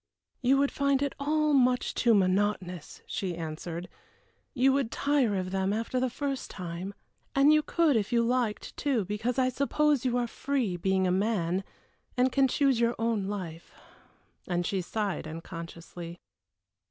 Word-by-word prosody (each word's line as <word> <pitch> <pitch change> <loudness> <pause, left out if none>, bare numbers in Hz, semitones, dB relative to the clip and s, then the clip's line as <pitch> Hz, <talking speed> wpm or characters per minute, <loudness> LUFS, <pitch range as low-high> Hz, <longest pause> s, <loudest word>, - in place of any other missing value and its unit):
"You 265 +2 +4
would 280 0 +2
find 280 -1 +1
it 280 - -1
all 305 +1 +2
much 250 -2 +3
too 235 -3 +3
monotonous," 185 -3 0
she 185 -3 -3
answered. 165 +2 -5 0.7
"You 265 +1 +4
would 275 -4 +1
tire 275 -5 +1
of 185 -1 -2
them 190 0 0
after 225 +4 -1
the 255 0 +1
first 275 +1 -3
time. 180 +2 -6 0.4
And 280 +2 +6
you 305 - +5
could 320 -2 +2
if 210 -3 0
you 235 -1 +3
liked, 240 -3 -1
too, 260 -8 0
because 215 +6 -2
I 255 -1 +3
suppose 280 +1 +1
you 250 -2 +1
are 245 - +1
free, 245 -5 -1
being 190 +2 +1
a 180 - +2
man, 190 -2 0 0.5
and 255 +1 +3
can 270 0 +4
choose 270 -2 +2
your 235 0 +2
own 225 -3 0
life," 175 -5 -6 0.7
and 175 -1 0
she 190 +1 0
sighed 200 -3 -3
unconsciously. 165 +1 -8
225 Hz, 160 wpm, -29 LUFS, 185-265 Hz, 0.7 s, And